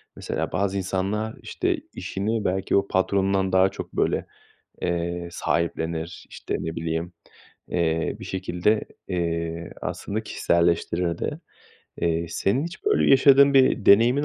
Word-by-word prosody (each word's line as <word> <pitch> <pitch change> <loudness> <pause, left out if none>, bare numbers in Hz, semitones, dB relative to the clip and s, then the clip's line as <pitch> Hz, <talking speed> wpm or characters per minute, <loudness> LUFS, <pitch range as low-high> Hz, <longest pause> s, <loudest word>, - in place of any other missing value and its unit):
Mesela - - -3
bazı 100 +1 0
insanlar, 100 +4 -2
işte, - - -1 0.2
işini 105 +3 -2
belki 95 +1 0
o 100 0 +1
patronundan 95 0 +1
daha 95 +1 +5
çok, - - -8
böyle, - - 0 0.6
eee, 85 0 -2
sahiplenir, 85 -1 -2
işte, - - -4
ne 80 0 -4
bileyim, 85 +1 -3 0.6
eee, 80 -1 0
bir - - -8
şekilde, 95 +3 0 0.3
eee, 85 -2 -2
aslında 110 +2 -4
kişiselleştirir 85 -2 +1
de. - - -3 0.6
Eee, 85 0 0
senin 100 - 0
hiç 175 +2 -8
böyle 415 0 +3
yaşadığın 140 +1 +7
bir 130 -4 +4
deneyimin 120 +8 +6
95 Hz, 125 wpm, -24 LUFS, 85-105 Hz, 0.6 s, yaşadığın